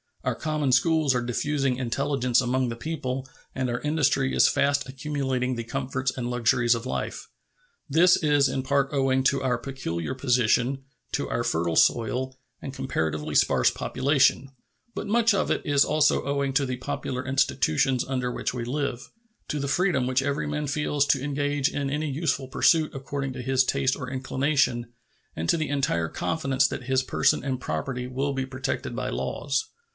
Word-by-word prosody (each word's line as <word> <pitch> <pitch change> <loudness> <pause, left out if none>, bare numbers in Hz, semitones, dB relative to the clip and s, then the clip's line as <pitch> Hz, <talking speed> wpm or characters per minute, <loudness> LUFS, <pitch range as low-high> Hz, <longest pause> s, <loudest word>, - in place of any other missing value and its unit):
Our - - 0
common 150 -3 -1
schools 150 +2 +3
are 125 - +1
diffusing 135 +2 -1
intelligence 130 0 +1
among 125 0 0
the 115 - -4
people 130 -1 -4 0.3
and 130 -1 -1
our 120 +1 -1
industry 145 -3 +1
is - - +6
fast 140 -1 +1
accumulating 130 -2 -2
the 115 - -4
comforts 130 +1 -2
and 120 -2 -3
luxuries 120 0 +2
of 115 +1 -5
life. - - -4 0.6
This 170 +5 +5
is 145 -3 +3
in 135 - -1
part 135 +1 +1
owing 135 -1 +2
to 135 0 +2
our 125 -2 +1
peculiar 120 - -4
position, 130 0 +1 0.3
to - - -1
our - - -1
fertile 80 0 0
soil 125 +6 +2 0.3
and 135 - -6
comparatively 80 - -2
sparse - - +4
population; 135 0 +1 0.5
but - - -4
much 225 +1 +3
of 185 - 0
it - - 0
is 145 -2 +4
also 150 0 +2
owing 140 -1 -1
to 140 +1 +2
the 125 -1 -3
popular 130 0 -4
institutions 130 - +1
under 125 -2 -1
which - - -3
we 120 -1 -3
live, 125 -1 -3 0.4
to 150 - -2
the 140 - -2
freedom 145 -2 +1
which 130 +1 +1
every 140 +2 -1
man 150 0 -2
feels 145 0 0
to 135 -1 +2
engage 145 -1 0
in 140 -1 -2
any 150 +2 -2
useful 140 -2 -1
pursuit 155 +4 +3
according 135 0 -4
to 130 - -6
his 130 +1 +2
taste 130 0 +1
or 125 -4 -6
inclination, 130 -2 0 0.4
and 80 +1 -3
to - - +4
the 155 - -2
entire 135 - 0
confidence 135 -4 0
that 130 - -5
his 130 +1 +1
person 130 - +1
and 130 -2 -2
property 125 -2 -3
will 135 +2 -2
be 135 -1 -2
protected 130 +1 -3
by - - -3
the - - -3
laws. 140 - -2
135 Hz, 175 wpm, -26 LUFS, 125-140 Hz, 0.6 s, is